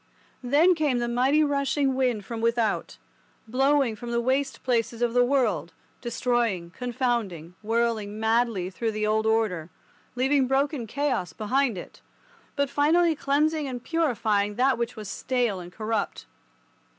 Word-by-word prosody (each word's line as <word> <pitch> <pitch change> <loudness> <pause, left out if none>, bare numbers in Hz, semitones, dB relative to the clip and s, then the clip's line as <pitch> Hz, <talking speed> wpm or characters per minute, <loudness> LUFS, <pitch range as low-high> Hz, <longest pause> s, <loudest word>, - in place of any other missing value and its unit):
Then 290 +8 +4
came 300 -6 +1
the 240 0 -1
mighty 260 +6 +3
rushing 280 -1 +1
wind 250 -6 0
from 230 0 -5
without, 230 -2 0 0.5
blowing 270 0 +2
from 240 +3 -8
the 235 0 0
waste 265 +3 -1
places 235 -2 0
of 235 -1 +1
the 245 0 +5
world, 265 0 0 0.3
destroying, 235 -7 -1
confounding, 235 - -2
whirling 220 -2 -1
madly 220 -4 +1
through 225 +3 -2
the 215 0 -1
old 220 +1 +1
order, 210 -7 0 0.5
leaving 265 +1 +2
broken 270 -2 0
chaos 245 - -1
behind 245 +2 0
it, 175 - -10 0.5
but 280 -1 +1
finally 320 +4 +3
cleansing 300 +2 +1
and 245 -2 -6
purifying 215 -10 0
that 255 +2 +2
which 235 0 -2
was 215 -3 -7
stale 240 -2 -1
and 175 0 -9
corrupt. 215 +1 -3
240 Hz, 140 wpm, -26 LUFS, 220-275 Hz, 0.5 s, the